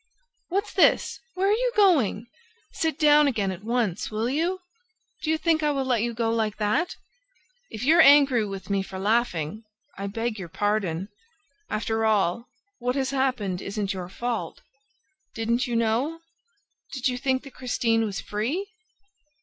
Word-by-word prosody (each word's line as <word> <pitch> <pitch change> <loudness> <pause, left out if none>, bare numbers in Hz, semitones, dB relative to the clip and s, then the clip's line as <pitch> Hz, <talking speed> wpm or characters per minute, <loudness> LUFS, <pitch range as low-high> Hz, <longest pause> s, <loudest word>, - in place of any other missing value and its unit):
"What's 395 +4 -1
this? 380 - +3 0.2
Where 380 +1 +1
are - - +4
you - - 0
going? 295 - +3 0.5
Sit 320 -3 -1
down 300 -1 +5
again 205 -8 0
at 185 +2 -8
once, 225 -5 -1
will 220 +2 -2
you?... 345 +6 -1 0.6
Do 310 - -3
you 320 - +2
think 320 0 +1
I 300 - +2
will 275 -2 -1
let 245 -4 +1
you 235 +1 0
go 230 0 -1
like 220 -2 -1
that?... 220 +12 0 0.7
If 215 - -6
you're 320 +6 +6
angry 280 -6 +6
with 195 -2 -6
me 200 -1 +2
for 190 0 -7
laughing, 210 -3 0 0.4
I 200 - -3
beg 225 +1 -3
your 175 -3 -7
pardon... 200 -2 -1 0.6
After 220 +1 -1
all, 215 0 +1 0.3
what 250 +1 -1
has 270 -1 -1
happened 250 -9 -1
isn't 200 -1 -3
your 180 -2 -6
fault... 235 +4 -4 0.7
Didn't 235 +3 0
you 240 - -2
know?... 235 +9 0 0.7
Did 265 -1 -1
you 250 - 0
think 260 0 0
that 275 - -12
Christine 230 -3 0
was 200 -3 -3
free? 270 - -3
235 Hz, 160 wpm, -25 LUFS, 210-280 Hz, 0.7 s, you're